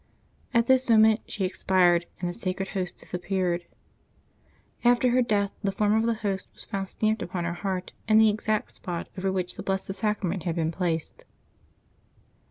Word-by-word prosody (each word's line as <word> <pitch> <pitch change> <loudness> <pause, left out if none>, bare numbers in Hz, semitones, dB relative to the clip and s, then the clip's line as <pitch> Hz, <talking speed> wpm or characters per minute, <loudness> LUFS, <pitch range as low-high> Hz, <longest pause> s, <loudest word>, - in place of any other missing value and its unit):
At 235 -2 +3
this 260 0 +3
moment 220 0 +6
she 195 - -2
expired, 180 -2 +3
and 175 - -2
the 175 - -3
Sacred 195 -1 -3
Host 185 -3 -3
disappeared. 180 -1 -2 1.2
After 245 +1 +4
her 255 +1 +4
death 205 -4 +1
the 200 - +1
form 210 +1 +1
of 220 +1 +2
the 230 - +2
Host 195 -1 -1
was - - -9
found 195 -1 -4
stamped 215 0 0
upon 175 0 -3
her 170 0 -2
heart 185 0 -3 0.2
in 215 0 +5
the 220 0 +7
exact 215 0 -1
spot 175 -2 -5
over 190 0 -1
which 185 -1 -3
the - - -4
Blessed 195 0 -2
Sacrament 200 -3 -1
had 165 0 -2
been 165 -1 0
placed. 165 -2 -3
195 Hz, 175 wpm, -27 LUFS, 180-215 Hz, 1.2 s, the